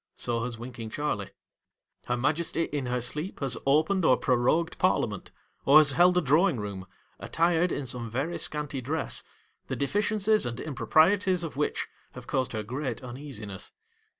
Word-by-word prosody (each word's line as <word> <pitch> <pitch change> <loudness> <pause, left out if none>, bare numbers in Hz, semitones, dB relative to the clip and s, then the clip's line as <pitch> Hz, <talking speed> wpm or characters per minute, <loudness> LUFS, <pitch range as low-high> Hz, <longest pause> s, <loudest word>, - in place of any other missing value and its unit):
So 115 -1 -1
has 120 -2 -5
Winking 115 -1 -7
Charley. 110 -6 -2 0.8
Her 120 - 0
Majesty 160 +6 0
in 145 -5 -3
her 125 0 -1
sleep 150 - -2
has 135 -3 +1
opened 160 +7 +3
or 130 - +5
prorogued 130 +7 +1
Parliament, - - 0 0.3
or 140 +2 +7
has 150 -2 +7
held 180 +4 +4
a - - +4
Drawing 155 +2 +3
Eoom, 100 -3 -5 0.3
attired 170 +1 +1
in 140 - -3
some 120 -2 -4
very 140 +9 -2
scanty 150 -3 -3
dress, 155 +6 -2 0.5
the - - -3
deficiencies 210 - +1
and 120 - -5
improprieties 180 +5 +2
of 165 - -5
which 150 +1 -1 0.3
have - - -10
caused 130 -2 -1
her 110 -1 -2
great 130 +1 -4
uneasiness. 120 -6 -7
140 Hz, 155 wpm, -28 LUFS, 120-165 Hz, 0.8 s, or